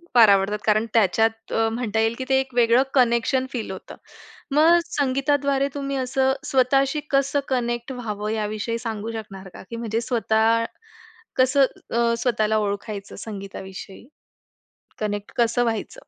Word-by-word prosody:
फार 225 -3 +8
आवडतात, 200 +1 +3
कारण 215 +1 +3
त्याच्यात 225 +1 +1
अ, 225 0 +2
म्हणता 225 -2 -2
येईल, 225 +1 +1
की 260 - -4
ते 265 0 +4
एक 265 -1 -4
वेगळं 240 +2 +4
कनेक्शन 250 +1 +2
फील 225 -6 -4
होतं. 190 - -9 0.6
मग 330 +3 +6
संगीताद्वारे 275 0 +1
तुम्ही 275 -1 -3
असं 265 +1 +1
स्वतःशी 270 +2 +2
कसं 275 +1 +2
कनेक्ट 240 0 -1
व्हावं, 215 -4 -4
याविषयी 215 +1 -2
सांगू 225 -1 -4
शकणार 195 -4 -8
का? - - -10
की 230 - -6
म्हणजे 230 0 -2
स्वतः 230 -1 +2 0.7
कसं 260 +2 +4 0.3
अ, 235 0 +2
स्वतःला 220 -3 +1
ओळखायचं, 205 -1 -4
संगीताविषयी? 195 0 -8 0.9
कनेक्ट 205 -1 -3
कसं 240 +1 +2
व्हायचं? 225 -3 -3
230 Hz, 140 wpm, -23 LUFS, 215-260 Hz, 0.9 s, फार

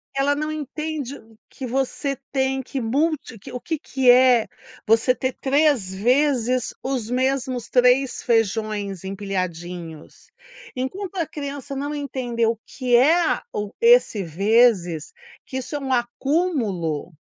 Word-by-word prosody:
Ela 280 +1 +2
não 305 +1 -2
entende 305 -2 -4 0.3
que 265 - -7
você 270 +2 -1 0.2
tem 265 0 0
que 265 +1 -5
multi 265 0 -1
que - - -11
o 250 - -5
que 320 +4 -3
que 265 -4 +3
é 250 -2 +5 0.4
você 225 +3 +4
ter 260 0 -2
3 275 -8 +2
vezes 250 +2 +1
os 255 -4 -2
mesmos 255 -1 -1
3 250 +1 +3
feijões 215 -4 0
empilhadinhos. 180 -4 -5 0.5
Enquanto 370 +10 -4
a 335 - +1
criança 280 -2 -6
não 285 +2 -3
entender 250 -5 -2
o 225 -1 0
que 250 -3 0
é 320 +7 +4
o 210 0 -4
esse 470 - +5
vezes, 185 -2 +2 0.4
que 260 - -5
isso 260 +3 -5
é - - -1
um 270 -1 -4
acúmulo, 240 - -1
255 Hz, 130 wpm, -23 LUFS, 220-280 Hz, 0.5 s, é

